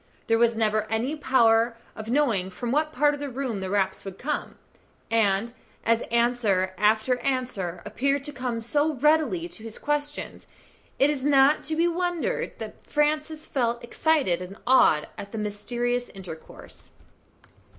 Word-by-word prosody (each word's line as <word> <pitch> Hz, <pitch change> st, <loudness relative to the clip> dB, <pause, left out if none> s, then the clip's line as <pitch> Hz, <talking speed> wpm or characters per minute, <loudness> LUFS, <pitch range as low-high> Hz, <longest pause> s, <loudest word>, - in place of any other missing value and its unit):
There 225 Hz, 0 st, +2 dB
was 235 Hz, -1 st, +3 dB
never 215 Hz, -1 st, +1 dB
any 235 Hz, +7 st, -1 dB
power 235 Hz, -5 st, +3 dB, 0.2 s
of 220 Hz, 0 st, -7 dB
knowing 235 Hz, -9 st, +1 dB
from 235 Hz, +6 st, -4 dB
what 305 Hz, +3 st, +1 dB
part 295 Hz, -1 st, +3 dB
of 290 Hz, -, -5 dB
the 285 Hz, -1 st, -4 dB
room 255 Hz, -5 st, -3 dB
the 190 Hz, -1 st, -4 dB
raps 190 Hz, -1 st, 0 dB
would 195 Hz, -1 st, -8 dB
come, 295 Hz, +3 st, -3 dB, 0.6 s
and 225 Hz, 0 st, +2 dB, 0.3 s
as 230 Hz, 0 st, +3 dB
answer 235 Hz, -6 st, +1 dB
after 220 Hz, +5 st, +2 dB
answer 250 Hz, -10 st, -2 dB
appeared 275 Hz, +6 st, 0 dB
to 295 Hz, -, -4 dB
come 250 Hz, -4 st, -3 dB
so 295 Hz, +6 st, +1 dB
readily 315 Hz, +5 st, +2 dB
to 220 Hz, -, -12 dB
his 225 Hz, -1 st, -8 dB
questions, 295 Hz, 0 st, -3 dB, 0.5 s
it 280 Hz, +2 st, +4 dB
is 275 Hz, -3 st, -4 dB
not 280 Hz, +1 st, +5 dB
to 315 Hz, -, -1 dB
be 335 Hz, +2 st, +3 dB
wondered 350 Hz, -1 st, -1 dB
at -, -, -30 dB
that -, -, -8 dB
Francis 305 Hz, +1 st, 0 dB
felt 240 Hz, -4 st, -1 dB
excited 250 Hz, -, +1 dB
and 185 Hz, +3 st, -8 dB
awed 245 Hz, -12 st, +5 dB
at 200 Hz, 0 st, -8 dB
the 225 Hz, -, -5 dB
mysterious 240 Hz, +4 st, -2 dB
intercourse. 180 Hz, -5 st, -11 dB
240 Hz, 160 wpm, -26 LUFS, 215-290 Hz, 0.6 s, not